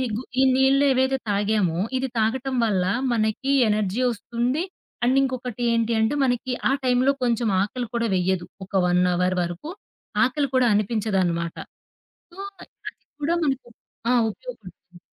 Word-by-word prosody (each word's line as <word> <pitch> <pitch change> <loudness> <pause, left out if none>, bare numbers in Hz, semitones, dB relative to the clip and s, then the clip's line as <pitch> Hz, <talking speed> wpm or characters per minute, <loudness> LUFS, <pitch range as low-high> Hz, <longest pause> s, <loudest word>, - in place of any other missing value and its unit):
గు 235 - -3 0.2
ఈ - - +5
నీళ్ళేవైతే 265 0 +3
తాగామో, 200 -4 +1 0.2
ఇది 265 +1 -1
తాగటం 260 +4 0
వల్ల 190 -5 +1 0.3
మనకి 220 +5 0 0.2
ఎనర్జీ 210 +2 0
ఒస్తుంది 240 - -2 0.4
అండ్ 255 +2 +3
ఇంకొకటి 250 -3 -3
ఏంటి 230 0 +1
అంటే 220 +5 +2
మనకి 250 0 0 0.2
ఆ - - +2
టైంలో 255 +2 +3
కొంచెం 235 -1 +1
ఆకలి 240 +4 -3
కూడా 235 -1 0
వెయ్యదు. 180 -1 0 0.2
ఒక 195 - -27
1 180 0 +2
అవర్ 180 +1 +1
వరుకు 175 - -5 0.5
ఆకలి 280 +3 +1
కూడా 255 -1 +4
అనిపించదన్నమాట. 195 -6 0 0.8
సో, 355 - -17 0.2
అది - - -14 0.5
కూడా 330 +4 +1
మనకు 270 -4 -1 0.4
ఆ! - - +4 0.2
ఉపయోగపడుతుంది. 185 - -11
235 Hz, 135 wpm, -24 LUFS, 200-260 Hz, 0.8 s, ఈ